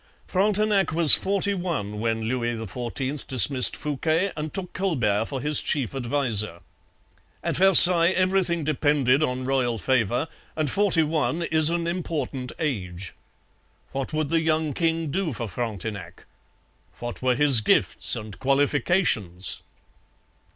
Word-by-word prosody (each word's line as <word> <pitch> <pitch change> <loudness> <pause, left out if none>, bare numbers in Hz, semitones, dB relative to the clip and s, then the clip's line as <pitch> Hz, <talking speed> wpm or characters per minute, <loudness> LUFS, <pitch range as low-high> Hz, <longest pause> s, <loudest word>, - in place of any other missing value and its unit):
Frontenac 200 -2 0
was 160 -2 +8
forty 200 +1 +2
one 160 - -5
when 110 0 -3
Louis 120 0 -3
XIV 125 +6 -6
dismissed 130 0 +4
Fouquet 160 +6 -2
and 150 0 -6
took 190 -2 -5
Colbert 120 - -1
for 135 +2 -6
his 150 0 0
chief 140 -6 -3
adviser. 120 -8 -1 0.8
At - - -3
Versailles 180 -2 +8
everything 185 -3 -1
depended 145 -2 0
on 130 -3 -3
royal 130 -3 -1
favour, 125 +3 -1 0.3
and 155 -4 -2
forty 195 -5 +1
one 160 +2 -2
is 160 -1 +3
an 170 0 -2
important 150 -7 -5
age. 95 - -5 0.8
What 135 -1 -5
would 155 -2 -3
the 165 +1 0
young 155 -2 -1
king 165 -2 -2
do 180 -2 -3
for 115 -1 -6
Frontenac? 100 -4 -7 0.7
What 120 0 -8
were 130 -1 0
his 140 -5 +5
gifts 105 - +1
and 105 -2 -10
qualifications? 135 - -1
145 Hz, 130 wpm, -23 LUFS, 120-165 Hz, 0.8 s, was